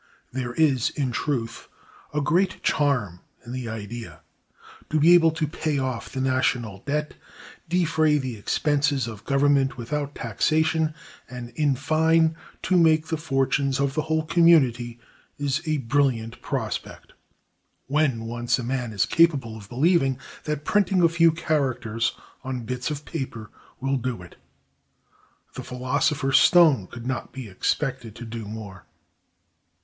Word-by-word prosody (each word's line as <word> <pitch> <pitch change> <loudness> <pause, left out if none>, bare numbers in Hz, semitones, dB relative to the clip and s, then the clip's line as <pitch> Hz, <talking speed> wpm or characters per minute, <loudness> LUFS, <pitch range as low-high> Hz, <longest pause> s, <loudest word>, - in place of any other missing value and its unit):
There 125 -1 -4
is, 140 -7 +3
in 135 -4 -2
truth, 120 -4 -3 0.4
a 150 - -1
great 180 +6 +1
charm 125 - +1 0.3
in 120 - -8
the 125 -2 -4
idea. 110 +1 -7 0.7
To 155 - +1
be 165 +4 +6
able 165 -2 +6
to 160 0 -1
pay 155 0 -2
off 130 -5 -3
the 135 - -4
national 125 -5 0
debt, 150 +1 -1 0.6
defray 160 -3 +2
the 130 -4 -3
expenses 145 +4 0
of 110 -2 -8
government 140 -2 +2
without 145 +4 -4
taxation, 155 +7 +1 0.3
and, 125 -1 -7
in 145 +2 +1
fine, 160 +3 +2 0.3
to 185 - +2
make 160 -1 +3
the 160 - -1
fortunes 135 -2 0
of 140 -1 0
the 155 - 0
whole 160 0 -1
community, 130 -9 +3 0.4
is 145 +1 -1
a 155 -1 +1
brilliant 125 -3 0
prospect, - - -5 0.7
when 135 -5 0
once 120 +2 -1
a 125 - -4
man 125 -2 -3
is 100 - +2
capable 145 -9 +2
of 105 -3 -11
believing 135 0 +2 0.3
that 150 -1 -3
printing 195 -3 +2
a 170 - +6
few 165 0 +4
characters 130 -8 -1 0.3
on 130 -3 -4
bits 125 +5 -3
of 150 -1 -5
paper 125 -9 -6 0.3
will 135 +1 0
do 125 -6 -4
it. 90 - -14 1.2
The - - -7
philosopher's 135 +2 +1
stone 155 - +5
could 120 +4 -10
not 130 -1 -3
be 130 -4 -7
expected 120 +3 -2
to 120 - -8
do 115 -1 -6
more. 105 -3 -9
135 Hz, 145 wpm, -24 LUFS, 120-155 Hz, 1.2 s, be